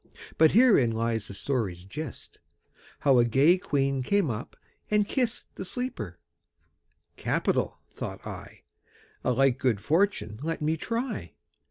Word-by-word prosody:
But 160 -1 +6
herein 215 - +6
lies 115 -1 -1
the 100 - -8
story's 100 -8 -2
gist, 150 +11 -8 0.6
How 135 -3 +5
a - - +6
gay 140 +10 +4
queen 140 -4 0
came 185 +1 +1
up 110 +1 -6 0.3
and 210 -1 +2
kist 245 -2 -1
The - - -6
sleeper. 180 - -4 1.0
'Capital!' - - 0
thought - - -7
I. - - -9 0.6
'A 125 - +2
like 135 0 +3
good 120 -6 +1
fortune 155 - 0
let 165 +2 -2
me 155 +1 +1
try.' 230 - -4
140 Hz, 135 wpm, -28 LUFS, 115-190 Hz, 1.0 s, But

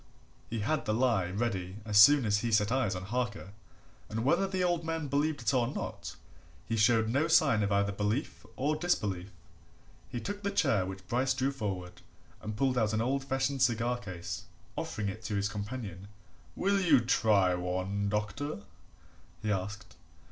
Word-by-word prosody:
He 115 -1 -3
had 155 +8 0
the 105 -1 0
lie 115 -7 +2
ready 95 -3 -2
as 105 -1 -3
soon 140 +4 +8
as 105 -1 +2
he 115 +1 -2
set 105 0 +3
eyes 125 -7 +1
on 90 - -5
Harker, 105 -2 -3 0.6
and 110 +2 -3
whether 175 +7 +3
the 190 -1 -1
old 175 -2 +1
man 165 -2 -2
believed 145 -1 0
it 110 - +1
or 120 -3 +2
not, 135 - -5 0.5
he 115 - -1
showed 110 0 +4
no 140 +8 +1
sign 155 -9 +4
of 100 0 0
either 100 0 +2
belief 105 +7 -2
or 145 +4 0
disbelief. 105 - -1 0.8
He 125 -2 -4
took 200 - -5
the 200 - -1
chair 105 - +2
which 95 -1 -8
Bryce 130 +4 +1
drew 135 +1 0
forward 95 -8 -5 0.4
and 105 -1 -5
pulled 130 -1 +2
out 110 -1 +1
an 110 - +1
old 135 +3 0
fashioned 135 0 -1
cigar 120 0 +2
case, 95 -6 -6 0.3
offering 105 -2 -3
it 100 +3 -5
to 105 - -2
his 100 0 +1
companion. 105 -3 -6 0.5
"Will 200 +1 +1
you 155 -8 +5
try 105 -5 +3
one, 95 +3 -2
doctor?" 105 +4 -3 0.8
he 105 - 0
asked. 100 0 -4
115 Hz, 175 wpm, -31 LUFS, 100-135 Hz, 0.8 s, soon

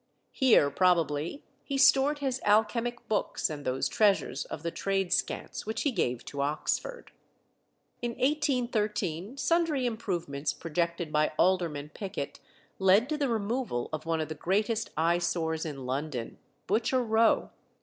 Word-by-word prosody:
Here, 235 - +4
probably, 165 - +1 0.2
he 275 - -3
stored 275 +2 +5
his 265 -3 -2
alchemic 230 +3 +1
books 210 -6 0
and 145 -2 -6
those 130 0 0
treasures 195 - +2
of 150 - -7
the 170 - -2
Tradescants 195 +2 -1
which 220 0 -2
he 285 - +2
gave 125 - -1
to 140 - -4
Oxford. 155 - -2 0.9
In 240 -1 -2
1813 235 - -1
sundry 325 -3 +1
improvements 170 - -2
projected 170 0 -2
by 150 0 +2
Alderman 170 -5 +1
Pickett 200 -1 -5 0.4
led 195 +7 +4
to 305 - -1
the 280 -3 +1
removal 225 - -1
of 155 +1 -4
one 165 -1 +1
of 155 -1 -2
the - - -3
greatest 210 +7 0
eye 170 +2 +3
sores 165 -2 -1
in 135 -4 -6
London 130 -2 -4 0.3
Butcher 235 +5 +1
Row. 225 0 +3
195 Hz, 140 wpm, -29 LUFS, 155-240 Hz, 0.9 s, stored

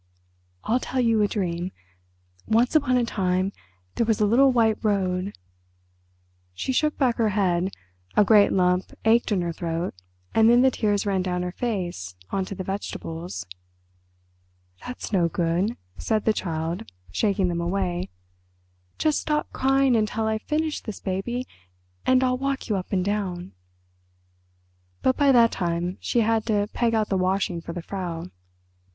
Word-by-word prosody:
I'll 240 +3 +1
tell 255 0 -3
you 230 -3 +3
a 205 - +4
dream. 180 -3 -2 0.8
Once 235 +6 +2
upon 255 -5 +4
a 245 - +2
time 190 -3 0 0.4
there 235 - +1
was 220 -2 +2
a 210 - +4
little 260 +6 +5
white 225 -3 +2
road—" 190 -2 0 1.2
She 260 - -2
shook 305 +3 +1
back 250 -4 +2
her 225 -2 +2
head, 190 -2 +1 0.5
a 210 - +6
great 205 -1 +6
lump 180 0 +1
ached 230 +1 +4
in 190 -4 +1
her 170 -1 -2
throat 170 +1 -3 0.4
and 225 0 +5
then 240 +1 +6
the 265 - +5
tears 205 -4 0
ran 195 -2 +1
down 180 -1 -1
her 180 - -3
face 175 - -3 0.2
on 195 -1 0
to 195 - -6
the 185 - -4
vegetables. 170 - -5 1.4
"That's 250 -3 -6
no 175 -3 +3
good," 175 +7 0 0.2
said 215 -1 0
the 220 - +4
Child, 165 - -3 0.2
shaking 195 - +1
them 170 -1 -1
away. 180 0 -1 0.9
"Just 310 -1 +1
stop 300 -1 -1
crying 270 -1 +3
until 220 0 0
I've 220 0 0
finished 310 +2 -2
this, 215 - -6
baby, 235 +7 -3 0.6
and 255 0 +5
I'll 255 0 +1
walk 275 -2 -2
you 210 - +2
up 185 -1 -4
and 185 -2 +1
down." 190 -4 -2 1.5
But 260 - +3
by 285 -2 +4
that 235 -3 +6
time 175 0 -2
she 235 - +1
had 225 0 +1
to 205 -2 +1
peg 230 -2 +1
out 215 -1 +1
the 195 - +1
washing 185 -2 0
for 170 - -7
the 175 -1 -6
Frau. 175 -4 -4
205 Hz, 160 wpm, -25 LUFS, 180-235 Hz, 1.5 s, a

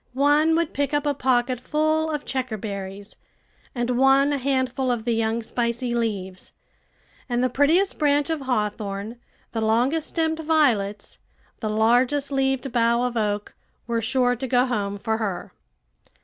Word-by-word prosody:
One 295 +4 +3
would 335 -1 0
pick 285 +1 -1
up 290 0 0
a 290 - +2
pocket 255 -2 +1
full 310 +4 0
of 300 -2 -3
checkerberries, 205 -6 -5 0.6
and 240 0 -1
one 270 +3 +4
a 280 - -1
handful 260 -1 0
of 235 -2 -1
the 240 - +1
young, 225 +1 0
spicy 235 +1 -2
leaves; 200 -6 -3 0.8
and 245 0 0
the 255 - +1
prettiest 320 +9 +2
branch 290 +1 +2
of 315 -3 -2
hawthorn, 210 -3 -3 0.3
the 225 - -2
longest 245 +8 +1
stemmed 320 -1 -1
violets, 240 -11 0 0.4
the 215 - -3
largest 245 +6 +2
leaved 270 -1 0
bough 235 0 +2
of 250 -1 -2
oak, 210 -2 -1 0.3
were 235 -1 -1
sure 245 +2 +1
to 260 +2 -5
go 250 0 +3
home 205 -5 -2
for 220 +2 -1
her. 200 -5 -4
245 Hz, 150 wpm, -24 LUFS, 220-285 Hz, 0.8 s, one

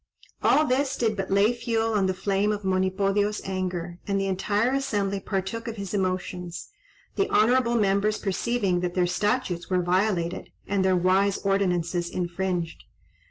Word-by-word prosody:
All 310 - +4
this 270 +1 +1
did 225 -3 +1
but 195 -1 -3
lay 200 +4 +4
fuel 225 -1 -1
on 200 -3 +2
the 185 - -1
flame 195 +2 0
of 205 -1 -3
Monipodio's 195 +2 +1
anger, 180 -2 -3
and 200 -1 +1
the 195 - 0
entire 205 +5 0
assembly 205 -8 -1
partook 195 +4 -3
of 230 - -4
his 200 -2 -6
emotions; 185 -2 -3 0.5
the 395 - +1
honourable 240 +2 +3
members 210 0 +2
perceiving 200 -2 0
that 175 0 -3
their 180 -1 +3
statutes 195 -1 -1
were 180 -1 +1
violated, 180 -1 0 0.2
and 195 -1 0
their 190 -1 +3
wise 190 +2 +2
ordinances 180 -3 0
infringed. 175 -1 -3
195 Hz, 155 wpm, -26 LUFS, 185-210 Hz, 0.5 s, All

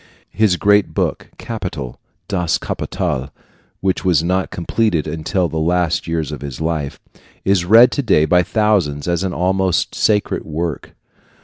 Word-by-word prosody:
His 105 -4 +2
great 105 +1 +3
book, - - -1
"Capital" 90 - -6 0.3
Das 90 -4 0
Kapital 65 +2 -3 0.5
which 95 -1 0
was 85 -4 +3
not 90 +2 0
completed 90 -1 0
until 80 +4 -1
the 80 - -3
last 85 +1 0
years 80 -3 -2
of - - -6
his 70 -3 -7
life, 80 -3 -2 0.5
is 95 -3 +2
read 115 +6 +7
to 140 - -1
day 80 - +3
by 90 +2 +4
thousands 90 -8 0
as 85 -1 0
an 95 - -1
almost 95 +1 0
sacred 105 -1 +1
work. 80 -1 -4
90 Hz, 145 wpm, -18 LUFS, 80-95 Hz, 0.5 s, read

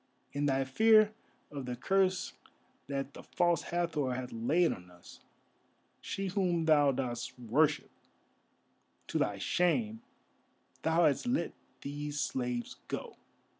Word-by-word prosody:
In 145 +1 0
thy 135 -1 +2
fear 215 +10 +5 0.4
of 140 -3 -6
the 125 - -2
curse 190 +7 +1 0.5
that 140 0 -3
the - - -9
False 175 -1 +1
Hathor 160 -7 -1
hath 125 0 -5
laid 155 +10 +2
on 90 0 -12
us, 90 -1 -15 0.8
she 195 - -4
whom 180 -4 +1
thou 145 -3 +5
dost 120 -3 -3
worship, 140 +5 +1 1.1
to - - -2
thy 100 - 0
shame, 215 - +1 0.8
thou 165 +1 +3
hast 150 - +2
let 250 +3 0 0.3
these 145 +1 -4
slaves 125 -3 -2
go. - - -5
145 Hz, 125 wpm, -32 LUFS, 130-175 Hz, 1.1 s, fear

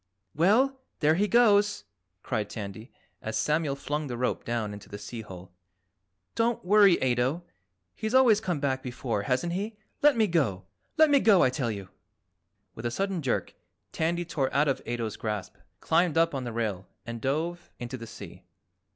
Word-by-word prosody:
"Well, 255 - +3 0.2
there 155 0 +4
he 200 +5 +2
goes!" 205 - +4 0.4
cried 110 -4 -2
Tandy 105 +3 -7 0.3
as 110 0 -3
Samuel 150 +4 +1
flung 150 +1 -3
the 120 -2 -4
rope 125 +1 -1
down 115 -3 -2
into 105 - -11
the 100 - -7
sea 115 +3 -7
hole. 95 -3 -11 0.8
"Don't 230 -3 0
worry, 200 -2 +6
Ato, 130 +6 +1 0.5
he's 220 +3 -3
always 235 -5 +6
come 180 -8 -2
back 135 -2 -1
before, 120 -4 -3
hasn't 130 +10 -1
he? 205 +4 -3 0.2
Let 290 -3 +5
me 220 - +4
go! 130 - 0 0.3
Let 310 -1 +6
me 280 - +6
go, 210 -7 +5
I 130 - +3
tell 130 -2 -1
you!" 100 -4 -5 0.9
With 115 +2 -4
a - - -1
sudden 195 +5 -2
jerk 130 -4 -1 0.4
Tandy 170 +2 -1
tore 140 -6 -1
out 145 +2 +2
of 135 -1 0
Ato's 115 -2 -3
grasp, 105 -3 -4 0.2
climbed 165 0 +2
up 165 0 +3
on 135 -2 -3
the 120 - -4
rail 105 -5 -3 0.2
and 115 -1 -6
dove 160 +7 -2
into 120 +1 -6
the 115 -2 -8
sea. - - -10
140 Hz, 175 wpm, -28 LUFS, 115-190 Hz, 0.9 s, worry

